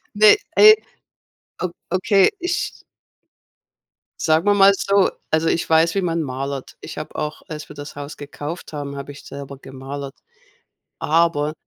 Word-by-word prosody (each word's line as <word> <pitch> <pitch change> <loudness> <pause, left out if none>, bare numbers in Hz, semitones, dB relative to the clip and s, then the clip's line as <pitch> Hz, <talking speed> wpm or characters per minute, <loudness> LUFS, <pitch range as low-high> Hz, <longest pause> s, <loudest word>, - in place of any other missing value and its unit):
Ne, 210 - +7 0.2
ne. 430 0 +10 0.9
O 180 - 0 0.2
Okay, 190 +2 +4
ich 350 0 -3 1.4
Sagen 160 +2 +2
wir 205 - +5
mal 200 0 +7
so, 200 0 +2 0.2
also, 160 +1 +1
ich 165 - 0
weiß, 160 +1 +4
wie 195 - 0
man 170 -2 -1
malert. 135 0 -5
Ich 155 - -9
habe - - -7
auch 150 0 -4
als 155 -1 -7
wir 150 - -11
das 145 0 -9
Haus 145 +1 -7
gekauft 145 +4 -7
haben, 140 -1 -5
habe 140 +1 -7
ich 145 - -13
selber 140 -1 -9
gemalert, 135 +1 -8 0.8
aber 155 -2 +2
155 Hz, 150 wpm, -21 LUFS, 140-180 Hz, 1.4 s, ne